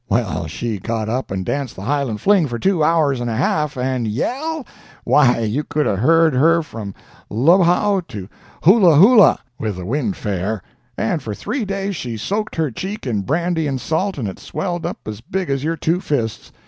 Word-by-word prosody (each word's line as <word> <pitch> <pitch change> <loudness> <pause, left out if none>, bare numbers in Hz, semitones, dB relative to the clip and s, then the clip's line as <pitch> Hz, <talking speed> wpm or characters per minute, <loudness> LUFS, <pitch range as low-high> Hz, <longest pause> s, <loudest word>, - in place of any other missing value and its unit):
Well, - - 0
she 115 -3 -3
just - - -20
got 110 -2 -1
up 130 +3 -2
and 95 -1 -3
danced 140 0 -3
the 95 - -8
Highland 135 -4 -1
fling 195 -6 +4
for 120 -2 -4
two 180 +3 +1
hours 150 -5 +2
and 120 0 -2
a 115 - -2
half—and 130 -3 0
yell!—why, 240 - 0
you 115 +7 -1
could 150 +1 -1
have 95 - 0
heard 165 +5 +4
her 165 +6 +4
from 110 -9 -8 0.3
Lu 140 - +4
wow 190 +3 +3
to 100 -3 -7 0.4
Hoolahoola, 190 - +7 0.2
with 110 -3 -2
the 90 -1 -7
wind 150 - -1
fair! 100 - -3 0.3
and 145 +8 -1
for 105 -2 -5
three 255 - -3
days 195 0 -3
she 120 -7 -5
soaked 210 - -3
her 160 -4 0
cheek 195 - -6
in 110 -6 -1
brandy 165 - 0
and 135 -2 -2
salt, 185 +7 -1
and 120 -6 -2
it 95 - -7
swelled 175 -3 -3
up - - -5
as 110 0 -6
big 185 - -3
as 135 0 -1
your 165 +2 -1
two 165 +4 0
fists. 115 - -3
145 Hz, 190 wpm, -19 LUFS, 115-175 Hz, 0.4 s, Hoolahoola